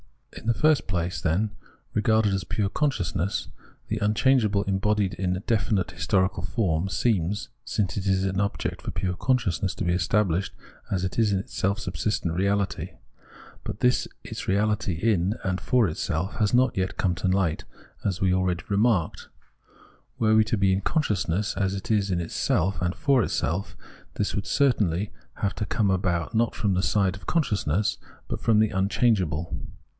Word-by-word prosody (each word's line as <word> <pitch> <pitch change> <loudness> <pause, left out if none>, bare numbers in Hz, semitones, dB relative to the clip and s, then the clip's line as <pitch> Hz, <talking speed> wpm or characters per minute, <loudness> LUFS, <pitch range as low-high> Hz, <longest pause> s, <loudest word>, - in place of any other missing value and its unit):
In - - -9
the 115 - +4
first 155 -2 +3
place, 90 -2 -2
then, 95 +6 +1 0.4
regarded 110 -1 +2
as 95 -1 -1
pure 100 +3 -1
consciousness, 100 - -1 0.4
the 110 - -1
unchangeable 105 -1 +3
embodied 100 0 +1
in 90 +1 -2
definite 105 -6 +1
historical 95 -1 0
form, 90 -2 0
seems, 105 -2 0 0.2
since 95 -5 -1
it 100 0 -2
is 95 0 +2
an 95 0 0
object 100 0 -2
for - - -6
pure 95 -2 -2
consciousness, 95 -6 0
to - - -3
be 90 0 +1
established 95 0 +1 0.4
as 95 -2 -1
it 95 +4 -2
is 110 -2 +3
in 100 - +2
its 95 - -9
self 100 +2 0
subsistent 105 -5 -2
reality 100 +2 -1 0.7
But - - -6
this, 125 0 +3 0.2
its - - -6
reahty 100 -2 +1
in 100 -1 +2
and 95 0 -1
for 125 -4 +3
itself, 80 +3 -2
has 105 -3 +2
not 125 0 +3
yet 95 0 -2
come 90 -3 +1
to 90 +3 -2
light, 90 -4 +1 0.4
as 95 -2 -1
we 95 -1 +3
already 90 -2 0
remarked. 100 -4 +1 0.9
Were 110 -1 +4
it 110 - 0
to 115 - +1
be 95 -1 +3
in 95 - 0
consciousness 100 - 0
as 95 0 0
it 100 +5 -4
is 100 -2 +2
in 90 -2 0
itself 90 +3 0
and 90 0 0
for 140 -5 +3
itself, 90 -2 -1 0.4
this 105 - -1
would 105 -2 -3
certainly 105 - +2 0.2
have 100 -2 -1
to 105 - -2
come 105 -1 +1
about 90 -3 0
not 115 0 +1
from 100 -3 0
the 90 - +1
side 95 -1 +1
of 90 - -15
consciousness, 105 - +1 0.3
but - - -3
from 110 -2 +3
the 110 0 +4
unchangeable. 95 -5 +1
100 Hz, 170 wpm, -26 LUFS, 90-110 Hz, 0.9 s, the